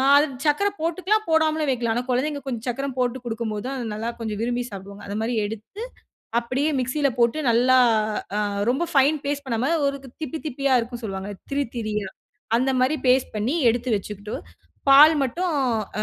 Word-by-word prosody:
அது 290 +1 +6 0.2
சர்க்கரை 395 +8 +2
போட்டுக்கலாம் 370 +6 0
போடாமலும் 315 -2 +2
வைக்கலாம். 235 -3 0
ஆனா, 245 - 0
குழந்தைங்க 285 +4 0
கொஞ்சம் 235 -4 -4
சக்கரம் 270 +2 -2
போட்டு 250 0 0
குடுக்கும் 225 -2 -3
போதான் 250 +6 -4
அத 245 - -4
நல்லா 220 +2 -3
கொஞ்சம் 220 -2 -4
விரும்பி 245 +1 -1
சாப்பிடுவாங்க. 200 +1 -9
அது 200 - -4
மாரி 235 +1 -1
எடுத்து 220 - -7 0.6
அப்டியே 255 +6 -1
மிக்ஸியில 270 +2 +1
போட்டு 235 +5 +3
நல்லா 250 +3 +4 0.6
அ - - +1 0.3
ரொம்ப 270 +7 +1
ஃபைன் 285 +2 +4
பேஸ்ட் 285 -1 -2
பண்ணாம 250 +4 0
ஒரு 280 0 -1 0.2
திப்பி 310 +1 -4
திப்பியா 275 -1 +1
இருக்கும் 240 +1 -7
சொல்லுவாங்க 195 -1 -4 0.2
திரி 285 +1 +1
திரியா 210 -3 -2 0.5
அந்த 260 +2 +1
மாரி 260 +5 +2
பேஸ்ட் 255 +1 +3
பண்ணி 220 +7 0 0.2
எடுத்து 245 +2 -2
வச்சுக்குட்டு. 205 +1 -6 0.6
பால் 295 +4 +9
மட்டும் 345 +7 -1 0.5
அ - - +1
255 Hz, 170 wpm, -24 LUFS, 230-285 Hz, 0.6 s, பால்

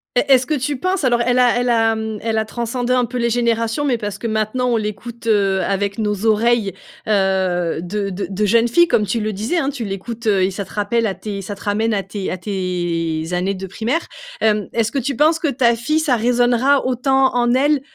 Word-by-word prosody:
Est 260 +3 +2
est-ce 255 - +1
que 310 - -2
tu 285 0 -1
penses, 370 +4 -1
alors 240 -2 +2
elle 245 +1 +2
a 245 -1 +4
elle 245 - 0
a 225 -1 +3 0.3
elle 220 0 -1
a 220 - +1
transcendé 240 +2 -2
un 250 -1 +3
peu 245 +2 -5
les 235 -1 +1
générations, 230 +2 0
mais 255 -5 +1
parce 205 -2 -5
que 215 - -4
maintenant 220 +3 -1
on 235 - +2
l'écoute, 220 +2 -6
heu, 195 -3 +2
avec 200 +1 -1
nos 210 -1 -2
oreilles, 220 -2 +2 0.3
heu, 190 -5 +1
de 195 +3 -3
de 190 +2 -4
de 200 +2 -1
jeunes 230 +3 +3
filles 345 +8 +4
comme 210 - +2
tu 220 +4 -1
le 215 -1 -2
disais, 220 - -2
hein. 275 -5 +1
Tu 275 -5 -5
l'écoutes, 220 +4 -5
heu, 200 -3 +3
et 190 - +1
ça 200 +2 -4
te 190 - -15
rappelle 220 +3 0
à 195 -3 -1
tes 205 -2 -6
ça 200 +2 -6
te 200 - -17
ramène 215 +2 0
à 200 - 0
tes 195 0 -5
à 185 - -3
tes 175 -4 -2
années 185 +3 0
de 190 0 -6
primaire. 235 - -2 0.3
Hem, 210 -2 +1
est-ce 225 -1 0
que 275 - +1
tu 270 0 -3
penses 315 +3 +4
que 315 - 0
ta 240 -2 +2
fille 305 +7 0
ça 295 -5 +2
résonnera 245 +4 +2
autant 260 +1 +2
en 240 0 +2
elle, 285 +2 +2
225 Hz, 235 wpm, -19 LUFS, 200-245 Hz, 0.3 s, a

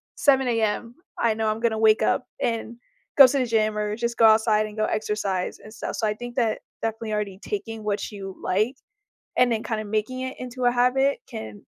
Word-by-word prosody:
7 270 -2 +3
AM, 230 0 -1 0.2
I 230 -2 +3
know 220 0 0
I'm 215 - -1
gonna 230 -2 +1
wake 220 -1 +5
up - - +1 0.2
and 230 0 -2 0.4
go 275 -2 +11
to 275 +2 0
the 255 - +1
gym 215 -2 +1
or 210 0 -1
just 235 +1 -3
go 225 - +6
outside 220 -1 +5
and 210 - -11
go 215 - +2
exercise 210 -4 -2
and 215 - -13
stuff." 225 - -5
So 220 - 0
I 210 - +1
think 240 +2 -8
that 225 -3 +1 0.2
definitely 225 -1 -3
already 205 -3 -2
taking 225 - -5
what 210 +1 -2
you 195 -2 -7
like 215 +8 0 0.6
and 250 -1 +4
then 225 -1 -1
kinda 220 -2 -2
making 220 +5 -2
it 260 0 -5
into 255 0 -6
a 245 - +5
habit 250 +3 +2
can 110 -2 -8
220 Hz, 210 wpm, -24 LUFS, 215-245 Hz, 0.6 s, go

